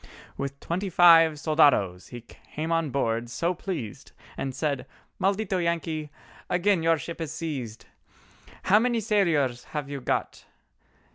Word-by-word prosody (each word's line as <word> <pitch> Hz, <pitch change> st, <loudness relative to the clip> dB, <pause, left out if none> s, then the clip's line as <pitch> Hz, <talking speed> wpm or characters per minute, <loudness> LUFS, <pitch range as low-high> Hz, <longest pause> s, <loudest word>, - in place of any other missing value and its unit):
With 140 Hz, 0 st, -5 dB
twenty 185 Hz, +4 st, -3 dB
five 165 Hz, -2 st, +7 dB
soldados 140 Hz, -, +3 dB
he 120 Hz, -1 st, -8 dB
came 155 Hz, +7 st, -7 dB
on 165 Hz, -2 st, +1 dB
board 115 Hz, -3 st, -1 dB
so 170 Hz, +8 st, -1 dB
pleased 160 Hz, -, -6 dB, 0.2 s
And 135 Hz, -1 st, -4 dB
said: 145 Hz, -4 st, -2 dB, 0.3 s
"Maldito 195 Hz, 0 st, 0 dB
Yankee—again 170 Hz, +3 st, -2 dB
your 165 Hz, 0 st, +3 dB
ship 170 Hz, +2 st, -7 dB
is 160 Hz, -3 st, -4 dB
seized. 130 Hz, -9 st, -5 dB, 0.8 s
How 205 Hz, +3 st, +5 dB
many 240 Hz, 0 st, +1 dB
sailors 160 Hz, -, +1 dB
have 145 Hz, -2 st, -5 dB
you 140 Hz, -1 st, -5 dB
got?" -, -, -2 dB
160 Hz, 130 wpm, -26 LUFS, 135-175 Hz, 0.8 s, five